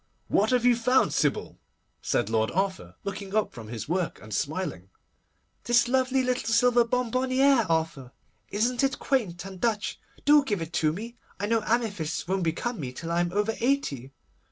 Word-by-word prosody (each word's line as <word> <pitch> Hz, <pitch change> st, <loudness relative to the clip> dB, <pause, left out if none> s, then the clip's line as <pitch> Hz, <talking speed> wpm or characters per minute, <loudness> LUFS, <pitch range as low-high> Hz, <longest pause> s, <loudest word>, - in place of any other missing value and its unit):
'What 210 Hz, +2 st, +3 dB
have 250 Hz, -1 st, +2 dB
you 245 Hz, -1 st, +6 dB
found, 250 Hz, +3 st, +2 dB
Sybil?' 145 Hz, -3 st, -1 dB, 0.4 s
said -, -, 0 dB
Lord 110 Hz, 0 st, +1 dB
Arthur, 190 Hz, +1 st, -2 dB
looking 200 Hz, 0 st, -5 dB
up 215 Hz, -, +1 dB
from 115 Hz, -4 st, -9 dB
his 115 Hz, 0 st, -6 dB
work, 175 Hz, +1 st, -1 dB
and 105 Hz, 0 st, -10 dB
smiling. 145 Hz, -, -3 dB, 0.8 s
'This 240 Hz, 0 st, +4 dB
lovely 260 Hz, +1 st, +2 dB
little 250 Hz, -2 st, -1 dB
silver 240 Hz, +1 st, +5 dB
bonbonnière, 255 Hz, 0 st, +2 dB
Arthur. 160 Hz, -6 st, -1 dB, 0.4 s
Isn't 240 Hz, +5 st, 0 dB
it 270 Hz, +1 st, +1 dB
quaint 200 Hz, -10 st, -1 dB
and 190 Hz, -2 st, -9 dB
Dutch? 220 Hz, -3 st, -1 dB, 0.3 s
Do 295 Hz, 0 st, +6 dB
give 205 Hz, -8 st, -1 dB
it 165 Hz, +1 st, -6 dB
to 155 Hz, -2 st, +2 dB
me! 230 Hz, +8 st, -7 dB, 0.2 s
I 205 Hz, -, -1 dB
know 225 Hz, +1 st, +1 dB
amethysts 195 Hz, -10 st, -1 dB
won't 190 Hz, +1 st, 0 dB
become 190 Hz, +8 st, -2 dB
me 130 Hz, -4 st, -4 dB
till 165 Hz, +6 st, -6 dB
I 170 Hz, -, +1 dB
am 175 Hz, 0 st, 0 dB
over 205 Hz, +3 st, 0 dB
eighty. 225 Hz, -, -1 dB
205 Hz, 175 wpm, -27 LUFS, 165-245 Hz, 0.8 s, you